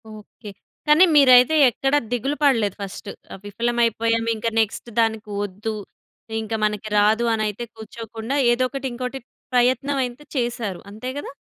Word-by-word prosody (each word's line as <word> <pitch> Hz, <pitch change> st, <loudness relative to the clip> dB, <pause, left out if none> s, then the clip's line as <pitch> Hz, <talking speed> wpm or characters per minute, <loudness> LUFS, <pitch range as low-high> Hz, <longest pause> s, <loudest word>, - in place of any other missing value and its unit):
Okay. 210 Hz, 0 st, -12 dB, 0.4 s
కానీ 300 Hz, +5 st, +7 dB
మీరైతే 255 Hz, 0 st, +7 dB
ఎక్కడ 270 Hz, +4 st, -2 dB, 0.2 s
దిగులు 255 Hz, +4 st, -1 dB
పడలేదు 230 Hz, -9 st, +2 dB
ఫస్ట్. 200 Hz, +1 st, -7 dB, 0.4 s
విఫలమైపోయాం 230 Hz, +1 st, 0 dB
ఇంక 220 Hz, +1 st, -4 dB
నెక్స్ట్ 220 Hz, +2 st, -1 dB
దానికి 220 Hz, -1 st, 0 dB
వద్దు. 205 Hz, +3 st, -5 dB, 0.7 s
ఇంకా 220 Hz, 0 st, -4 dB
మనకి 210 Hz, 0 st, -3 dB
రాదు 215 Hz, +3 st, +3 dB
అని 220 Hz, -1 st, 0 dB
అయితే 210 Hz, +3 st, -5 dB
కూర్చోకుండా, 225 Hz, +2 st, -6 dB, 0.2 s
ఏదో 240 Hz, +2 st, +1 dB
ఒకటి 270 Hz, +1 st, -6 dB
ఇంకోటి 250 Hz, +2 st, -5 dB, 0.3 s
ప్రయత్నమైతే 255 Hz, +1 st, +1 dB
చేసారు. 235 Hz, -6 st, -2 dB
అంతే 220 Hz, +5 st, -6 dB
కదా? 290 Hz, -, -6 dB
230 Hz, 130 wpm, -22 LUFS, 215-255 Hz, 0.7 s, కానీ